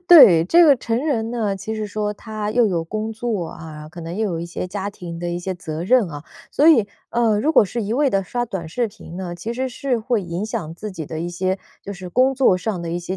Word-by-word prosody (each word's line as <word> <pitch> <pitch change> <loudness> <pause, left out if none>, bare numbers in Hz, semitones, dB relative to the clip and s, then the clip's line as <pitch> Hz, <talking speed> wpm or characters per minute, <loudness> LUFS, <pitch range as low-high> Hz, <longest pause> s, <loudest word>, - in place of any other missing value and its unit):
对， 185 - +9
这 340 - +6
个 290 -4 +7
成 240 +4 -2
人 230 -6 0
呢， 215 -5 -1
其 215 +3 -5
实 215 -1 -3
说 210 0 -2
他 215 0 -5
又 235 +1 +4
有 175 -5 0
工 215 +6 -4
作 215 -6 -2
啊， 155 -2 -9
可 175 +2 -10
能 165 +2 -6
又 220 +1 0
有 165 - -3
一 170 - -4
些 170 - -4
家 195 +2 -4
庭 170 -4 -8
的 175 - -2
一 175 0 -2
些 185 +1 -3
责 165 -1 -5
任 240 -3 +4
啊， 145 +1 -8 0.3
所 295 - +3
以， 235 -11 +6 0.2
呃， 230 -3 +2
如 305 +8 +2
果 230 - +6
是 225 +4 -3
一 205 - -2
味 275 +2 +2
地 195 0 +1
刷 240 +6 -2
短 190 -8 -5
视 235 +6 -1
频 190 -5 -11
呢， 180 -2 -5
其 225 +7 -5
实 260 +1 -1
是 250 -1 -1
会 220 0 0
影 175 +2 -4
响 165 -7 -4
自 210 +4 -6
己 165 -6 -6
的 160 0 -5
一 175 - -2
些， 185 +2 -1 0.2
就 200 - -7
是 185 -2 -8
工 255 +8 +3
作 245 -9 +4
上 185 -4 -3
的 165 - -4
一 175 - -1
些 180 +2 -4
205 Hz, 285 characters per minute, -21 LUFS, 175-235 Hz, 0.3 s, 对